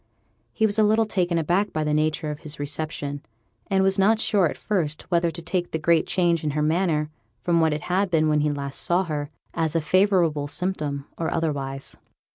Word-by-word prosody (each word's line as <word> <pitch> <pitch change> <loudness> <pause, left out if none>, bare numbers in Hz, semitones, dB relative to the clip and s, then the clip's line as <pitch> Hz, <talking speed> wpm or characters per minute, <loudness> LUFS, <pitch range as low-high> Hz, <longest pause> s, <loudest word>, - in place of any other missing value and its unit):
He 220 - +1
was 215 0 +2
a - - +6
little 220 +2 +3
taken 180 -5 0
aback 175 +6 +1
by 155 - -1
the 150 0 0
nature 155 +1 0
of 150 - -7
his 155 -3 -8
reception, 145 -1 -3 0.5
and 190 -1 +2
was 195 +1 +2
not 215 +3 +4
sure 200 -5 +2
at - - -7
first 165 -8 -2
whether 170 0 +3
to 170 0 -7
take 175 0 -1
the - - -2
great 160 +1 +2
change 170 -3 +1
in 150 - 0
her 150 - +2
manner, 155 -2 +1 0.3
from 170 -1 +2
what 160 -1 +3
it 150 0 -2
had 190 +2 0
been 160 -2 +2
when 150 0 +2 0.2
last 140 -1 -4
he - - -1
saw 175 +2 +2
her, 150 -4 -3 0.2
as 165 -1 -1
a - - +4
favourable 170 -3 +2
symptom 150 -3 -2
or 165 - -1
otherwise. 135 -4 -3
165 Hz, 210 wpm, -24 LUFS, 150-185 Hz, 0.5 s, a